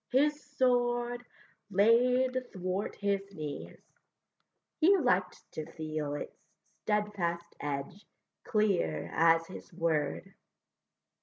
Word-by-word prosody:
his 295 +3 +2
sword 245 -1 +2 0.5
Laid 250 +5 +3
thwart 185 +2 -3
his 200 -1 0
knees; 150 -3 -6 1.0
he 370 +5 +6
liked 185 - +1
to 155 - -6
feel 155 -2 -3
Its - - -6 0.5
steadfast 190 -5 -1
edge 145 +7 -4 0.4
clear 195 - +1
as 165 0 +4
his 185 +3 -10
word. 165 -4 -1
200 Hz, 90 wpm, -31 LUFS, 165-245 Hz, 1.0 s, he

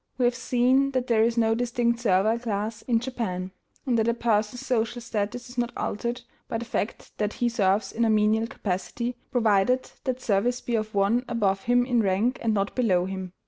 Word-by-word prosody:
We 250 - +2
have 245 - +3
seen 255 +2 +2
that 255 -1 0
there 230 -3 +3
is 230 +1 +2
no 225 -1 +3
distinct 235 0 0
servile 215 +1 +2
class 215 -1 -3
in 235 -2 +1
Japan, 220 -7 -4 0.3
and 245 -4 +2
that 220 - +1
a 235 - +2
person's 230 +2 0
social 240 -1 0
status 230 +1 -3
is 245 0 -6
not 240 0 0
altered 240 +3 -3 0.2
by 225 - -2
the 235 - -5
fact 225 - -4
that 210 0 0
he 240 - 0
serves 200 -3 +1
in 235 - -1
a 225 - +3
menial 215 +1 +3
capacity, 230 +5 -3
provided 240 0 +2
that 255 -1 -1
service 240 +2 +1
be 240 - -5
of 215 -2 -1
one 205 +5 +2
above 195 -5 0
him 245 +1 +3
in 245 -2 +2
rank 210 +6 +1
and 225 - +1
not 200 0 -1
below 190 -8 +2
him. 190 -1 -5
230 Hz, 200 wpm, -26 LUFS, 210-245 Hz, 0.3 s, have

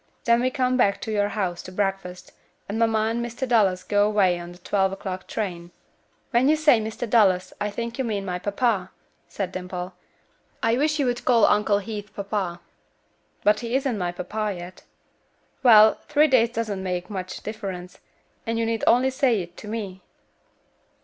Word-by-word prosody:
Then 235 0 +3
we 255 - +2
come 255 -2 0
back 200 -5 +2
to 220 - -4
your 205 -1 +1
house 185 -5 -2
to 185 - -10
breakfast, 195 -2 -3 0.4
and 210 +3 -3
mamma 220 -1 +2
and 235 +1 -2
Mr. 240 +3 -4
Dallas 195 -6 +2
go 205 +1 +2
away 190 -4 +2
on 175 0 -8
the 175 - -13
twelve 190 +1 0
o'clock 190 -1 -6
train." 175 -5 -4 0.6
"When 255 +3 +3
you 310 - +5
say 300 -7 +4
Mr. 220 +2 -4
Dallas 190 -5 +3
I 205 - 0
think 235 +4 -5
you - - +1
mean 210 -4 -2
my 180 -1 -3
papa," 200 -1 0 0.4
said 195 -3 -4
Dimple. 180 0 -6 0.7
"I 225 +1 +3
wish 300 +4 +1
you 285 - +1
would 245 -1 -1
call 235 -4 +5
Uncle 210 0 +3
Heath 210 -1 -6
papa." 195 -3 -3 0.8
"But 210 +1 +4
he 235 +1 -3
isn't 265 -3 0
my 175 -1 -1
papa 210 +3 -3
yet." 175 +1 -10 0.8
"Well, 220 -4 +7
three 300 0 +5
days 245 -5 +4
doesn't 220 -4 -3
make 180 0 -3
much 185 -2 -6
difference, 195 -4 -6 0.5
and 230 0 -1
you 230 - 0
need 225 -1 -2
only 255 +3 +4
say 260 -4 +2
it 175 0 -14
to - - -10
me." 205 -4 -5
210 Hz, 180 wpm, -24 LUFS, 185-235 Hz, 0.8 s, Well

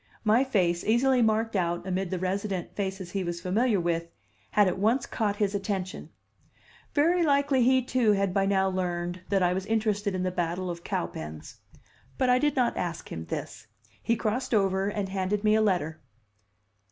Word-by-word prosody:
My 225 +4 +4
face, 180 -10 +1
easily 250 +3 +3
marked 220 0 +1
out 175 -1 0
amid 190 0 -2
the 185 - -2
resident 190 0 -3
faces 190 -3 -4
he 195 0 -2
was 175 -1 -3
familiar 205 +5 +1
with, 170 -1 -1 0.4
had 205 -2 +4
at 185 - -1
once 230 +6 +2
caught 210 -2 -1
his 205 -1 0
attention; 195 -2 -3 0.9
very 335 +4 +3
likely 280 -4 +3
he, 260 +1 +4
too, 245 -4 +2
had 195 -2 0
by 195 0 +2
now 190 -1 +2
learned 175 -1 -2
that 195 -2 +2
I 180 0 +3
was 190 +2 -3
interested 210 -3 0
in 185 - -1
the 185 - 0
battle 175 +1 -2
of 170 0 -8
Cowpens; 80 -2 -5 0.6
but 255 - +3
I 250 - +4
did 295 0 +1
not 250 -3 +1
ask 170 -2 -4
him 80 0 -5
this. - - -6 0.3
He 230 - +1
crossed 225 +2 -1
over 195 -1 +2
and 205 -1 -2
handed 195 +2 -1
me 215 0 +4
a 220 - +4
letter. 175 -7 0
195 Hz, 180 wpm, -27 LUFS, 180-225 Hz, 0.9 s, My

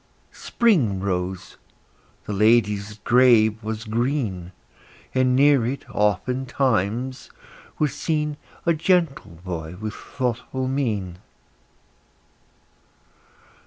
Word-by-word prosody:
Spring 150 - +1
rose; 95 -1 -3 0.7
the 105 - -4
lady's 105 -1 +2
grave 115 -3 +4
was 110 0 -4
green; 110 -6 -2 0.6
And 130 -1 +2
near 140 -2 +5
it, 130 +4 -4
oftentimes, 120 +2 0 0.5
was 150 -3 0
seen 150 0 -2 0.3
A 170 - +4
gentle 160 - 0
boy 85 -2 -5
with 110 0 -4
thoughtful 130 +1 -3
mien. 105 -10 -2
120 Hz, 85 wpm, -23 LUFS, 105-135 Hz, 0.7 s, near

